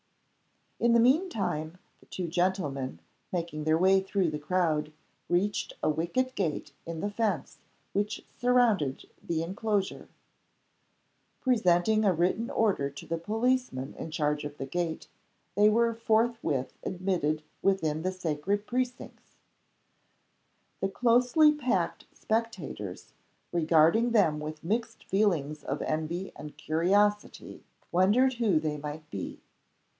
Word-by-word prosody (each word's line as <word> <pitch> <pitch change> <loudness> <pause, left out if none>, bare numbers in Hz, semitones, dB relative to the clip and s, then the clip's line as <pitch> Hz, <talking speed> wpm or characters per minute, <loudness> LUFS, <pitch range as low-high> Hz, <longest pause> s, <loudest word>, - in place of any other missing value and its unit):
In 235 0 +3
the 235 - +6
mean 280 +11 +4
time 160 - -3 0.2
the - - -22
two 180 -2 -4
gentlemen, 155 - -1 0.3
making 165 -4 -3
their 155 0 +3
way 190 +2 +4
through 190 -3 0
the 150 - -4
crowd, 155 -2 0 0.4
reached 200 +4 0
a 155 - +3
wicket 175 +12 -1
gate 160 - -2 0.2
in 165 -1 -4
the 205 - -2
fence 205 -8 -2 0.3
which 205 +1 -2
surrounded 235 - +1
the 165 -1 -2
inclosure. 200 +2 -2 1.3
Presenting 215 -3 +3
a 195 -3 +4
written 185 +8 0
order 195 -11 +1
to 140 0 -10
the 165 0 -3
policeman 220 - -1
in - - -7
charge 150 -1 0
of 145 0 -7
the 135 - -4
gate, 165 +3 -3 0.5
they 210 +3 +5
were 230 +2 +3
forthwith 225 - 0
admitted 175 -5 -1 0.2
within 160 -6 +1
the 185 +2 -1
sacred 185 +3 -2
precincts 250 +1 -4 1.4
The 195 - 0
closely 250 +8 +4
packed 260 -5 -1
spectators, 195 - -4 0.4
regarding 170 +8 +4
them 165 -9 +3
with 150 0 -6
mixed 225 +5 -2
feelings 165 -8 0
of 140 - -3
envy 160 +4 -2
and 150 0 -9
curiosity, 205 +6 0 0.3
wondered 210 +9 +4
who 215 -9 +2
they 155 -1 -2
might 150 +1 -7
be. 95 -2 -5
185 Hz, 125 wpm, -29 LUFS, 155-220 Hz, 1.4 s, the